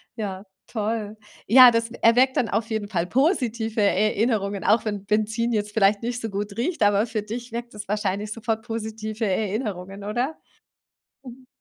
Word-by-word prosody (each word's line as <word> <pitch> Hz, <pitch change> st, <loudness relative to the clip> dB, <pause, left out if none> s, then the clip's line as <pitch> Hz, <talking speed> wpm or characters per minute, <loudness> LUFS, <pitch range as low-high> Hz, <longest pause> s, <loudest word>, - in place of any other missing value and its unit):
ja, 200 Hz, -3 st, -5 dB, 0.2 s
toll. 215 Hz, -1 st, -3 dB, 0.3 s
Ja, 250 Hz, +2 st, +9 dB
das 230 Hz, 0 st, 0 dB
e -, -, -8 dB
erweckt 250 Hz, +3 st, +4 dB
dann 235 Hz, -, +2 dB
auf 225 Hz, +1 st, -1 dB
jeden 220 Hz, -2 st, -2 dB
Fall 175 Hz, -4 st, -1 dB
positive 235 Hz, -, 0 dB
Erinnerungen, 205 Hz, 0 st, +1 dB
auch 220 Hz, +2 st, +3 dB
wenn 205 Hz, -2 st, -3 dB
Benzin 215 Hz, +3 st, 0 dB
jetzt 210 Hz, -1 st, -1 dB
vielleicht 200 Hz, 0 st, +3 dB
nicht 245 Hz, +1 st, -3 dB
so 225 Hz, -, -3 dB
gut 200 Hz, +1 st, -4 dB
riecht, 310 Hz, +1 st, -1 dB
aber 205 Hz, +1 st, +3 dB
für 220 Hz, -2 st, -3 dB
dich 235 Hz, +2 st, -7 dB
weckt 235 Hz, 0 st, -6 dB
das 210 Hz, -2 st, -8 dB
wahrscheinlich 205 Hz, 0 st, -2 dB
sofort 225 Hz, 0 st, -3 dB
positive 220 Hz, 0 st, -4 dB
Erinnerungen, 200 Hz, -1 st, -3 dB
oder? 245 Hz, +9 st, -2 dB, 0.9 s
Mhm. 255 Hz, 0 st, -12 dB
220 Hz, 165 wpm, -24 LUFS, 205-235 Hz, 0.9 s, Ja